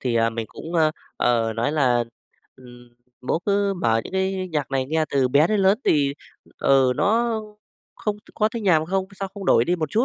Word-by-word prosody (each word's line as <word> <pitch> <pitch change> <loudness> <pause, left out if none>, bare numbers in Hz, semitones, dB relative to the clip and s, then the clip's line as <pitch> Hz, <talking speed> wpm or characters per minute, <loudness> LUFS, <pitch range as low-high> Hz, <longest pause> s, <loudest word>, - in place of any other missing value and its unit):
Thì, 125 -3 -1
à, 115 0 +2
mình 115 -1 -4
cũng, 165 +2 -9
ơ, 155 -2 +3 0.3
ờ, 115 -2 +1
nói 115 +6 -1
là, 125 -5 +2 0.5
ừm, 120 -1 -16 0.3
"Bố - - +2
cứ 200 0 +1
mở 115 -10 +1
những - - -9
cái 190 0 -1
nhạc 145 -3 -2
này 130 -1 -1
nghe 155 +2 0
từ 135 -2 +2
bé 145 +5 +4
đến 210 0 +1
lớn 195 +3 +4
thì, 140 -2 +2 0.4
ừ, 135 -2 +3
nó 225 +2 +1 0.5
không 210 -1 -3 0.2
có 215 -1 +2
thấy 225 0 -6
nhàm 160 -6 +3
không, 190 +2 0 0.2
sao 195 - -2
không 200 -2 -7
đổi 115 - +4
đi 180 +5 0
một 155 -3 -3
chút, 230 +3 +2
155 Hz, 210 wpm, -23 LUFS, 125-195 Hz, 0.5 s, bé